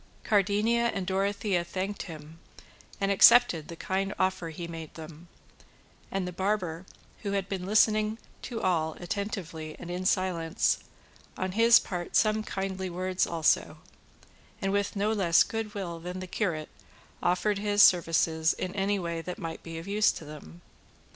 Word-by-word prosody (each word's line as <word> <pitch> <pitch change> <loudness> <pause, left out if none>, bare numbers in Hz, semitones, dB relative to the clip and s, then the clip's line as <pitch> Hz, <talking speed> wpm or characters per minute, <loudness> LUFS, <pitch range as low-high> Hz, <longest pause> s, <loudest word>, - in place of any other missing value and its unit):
Cardenio 210 +3 +2
and 200 -5 -1
Dorothea 195 -1 0
thanked 190 +3 -4
him, 160 -1 -10 0.6
and 195 0 +1
accepted 195 -5 +6
the 170 - -8
kind 195 +3 -2
offer 185 -3 0
he 170 +2 -6
made 165 -2 -8
them; 160 +1 -10 0.8
and 190 -2 -2
the - - -4
barber, 185 -2 -2 0.3
who 200 -2 -3
had 195 -1 -1
been 190 -2 -4
listening 215 +1 +3 0.2
to 235 -3 -5
all 160 -4 +1
attentively 175 -4 -5
and 175 - -8
in 180 +1 -3
silence, 180 -4 +1 0.6
on 185 0 -2
his 230 +3 +6
part 175 -3 -5
some 215 0 +3
kindly 190 -2 -4
words 185 +1 -1
also, 165 -2 +1 0.8
and 195 -1 -1
with 200 +1 0
no 205 +2 +1
less 175 -6 +4
good 225 -2 -5
will 175 -4 -4
than 180 +2 -6
the 185 - -5
curate 170 -5 -2 0.5
offered 195 +3 +1
his 205 0 +4
services 165 -2 +4
in 185 - -4
any 200 +1 0
way 170 -3 -3
that 180 +2 -6
might 165 -1 -6
be 165 -1 -8
of 165 +3 -8
use 210 +1 +3
to 160 - -9
them. 115 - -11
185 Hz, 155 wpm, -28 LUFS, 170-205 Hz, 0.8 s, accepted